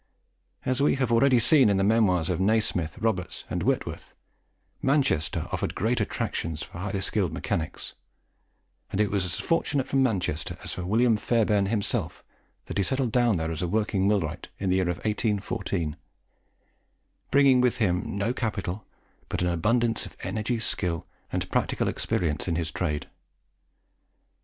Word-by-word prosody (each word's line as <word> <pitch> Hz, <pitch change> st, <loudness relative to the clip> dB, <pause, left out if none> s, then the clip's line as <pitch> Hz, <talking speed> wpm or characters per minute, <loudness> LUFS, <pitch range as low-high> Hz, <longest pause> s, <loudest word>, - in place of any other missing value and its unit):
As 130 Hz, +1 st, +1 dB
we 145 Hz, -, +4 dB
have 130 Hz, -3 st, 0 dB
already 125 Hz, +2 st, +5 dB
seen 125 Hz, +1 st, +5 dB
in 100 Hz, -, +2 dB
the 95 Hz, -, +2 dB
memoirs 95 Hz, -5 st, +3 dB
of 90 Hz, -, -1 dB
Nasmyth, 95 Hz, -5 st, +1 dB
Roberts, 105 Hz, -6 st, -2 dB
and -, -, -1 dB
Whitworth, -, -, -2 dB, 0.7 s
Manchester 130 Hz, -, +1 dB
offered -, -, -2 dB
great -, -, +1 dB
attractions 80 Hz, -2 st, -2 dB
for 85 Hz, -, -10 dB
highly 95 Hz, +1 st, -2 dB
skilled 95 Hz, -5 st, 0 dB
mechanics; 80 Hz, -1 st, -3 dB, 1.0 s
and 95 Hz, -, -2 dB
it 105 Hz, -1 st, +2 dB
was 100 Hz, -2 st, +1 dB
as 90 Hz, -, -1 dB
fortunate 145 Hz, -5 st, 0 dB
for 135 Hz, -, -1 dB
Manchester 105 Hz, -, 0 dB
as -, -, -4 dB
for 90 Hz, -1 st, -5 dB
William 115 Hz, +2 st, +3 dB
Fairbairn 105 Hz, -3 st, +2 dB
himself 105 Hz, -1 st, -1 dB, 0.4 s
that -, -, -3 dB
he -, -, +3 dB
settled 130 Hz, +1 st, 0 dB
down 120 Hz, -5 st, +3 dB
there 80 Hz, 0 st, -2 dB
as 80 Hz, -, -3 dB
a 90 Hz, -, 0 dB
working 100 Hz, -1 st, +1 dB
millwright 90 Hz, -7 st, 0 dB
in 95 Hz, -1 st, -1 dB
the 95 Hz, -, +3 dB
year 95 Hz, -, +2 dB
1814, 100 Hz, -4 st, -1 dB, 1.3 s
bringing 135 Hz, -2 st, +5 dB
with 125 Hz, -1 st, +2 dB
him 95 Hz, -3 st, 0 dB
no 105 Hz, +4 st, 0 dB
capital, 105 Hz, -5 st, -3 dB, 0.4 s
but -, -, -1 dB
an 90 Hz, -, +2 dB
abundance 115 Hz, +7 st, +1 dB
of -, -, -15 dB
energy, 110 Hz, +2 st, -1 dB
skill, 90 Hz, -7 st, -2 dB, 0.3 s
and -, -, -2 dB
practical -, -, 0 dB
experience 75 Hz, -2 st, -1 dB
in 85 Hz, -, 0 dB
his 80 Hz, -1 st, -2 dB
trade. 75 Hz, -3 st, -2 dB
100 Hz, 155 wpm, -27 LUFS, 90-115 Hz, 1.3 s, already